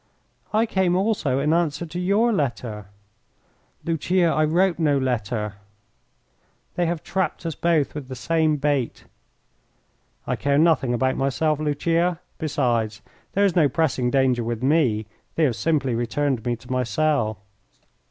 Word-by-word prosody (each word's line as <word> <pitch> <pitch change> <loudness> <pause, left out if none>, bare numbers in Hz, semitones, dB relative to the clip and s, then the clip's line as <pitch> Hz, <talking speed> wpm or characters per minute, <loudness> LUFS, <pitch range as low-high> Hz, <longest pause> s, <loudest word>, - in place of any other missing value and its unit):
"I 220 +2 +3
came 190 -5 +1
also 190 - +1
in 150 +3 +1
answer 170 -1 0
to 170 +2 -6
your 205 +6 +2
letter." 120 - -3 1.0
"Lucia, 170 +2 +1
I 155 - +2
wrote 175 +3 +2
no 150 -3 +3
letter." 110 -5 -2 1.2
"They 175 -1 0
have 170 -2 -2
trapped 190 -2 -2
us 165 - -2
both 160 -3 +1
with 145 -3 -6
the 130 - -6
same 160 +3 +1
bait." 140 -4 -1 1.2
"I - - -1
care 140 0 +1
nothing 145 -6 +3
about 130 +2 0
myself, 150 +3 0
Lucia. 165 +3 0 0.2
Besides, 120 -8 -1 0.3
there 200 +1 +3
is 195 - +1
no 155 -5 +4
pressing 135 -4 0
danger 130 -2 +2
with 115 +1 -3
me. 130 -7 +2 0.3
They 165 - +2
have 130 -6 +2
simply 140 -3 0
returned 120 +1 -1
me 120 - +1
to 125 +2 -13
my 130 0 +1
cell." 125 -2 0
145 Hz, 145 wpm, -23 LUFS, 125-165 Hz, 1.2 s, no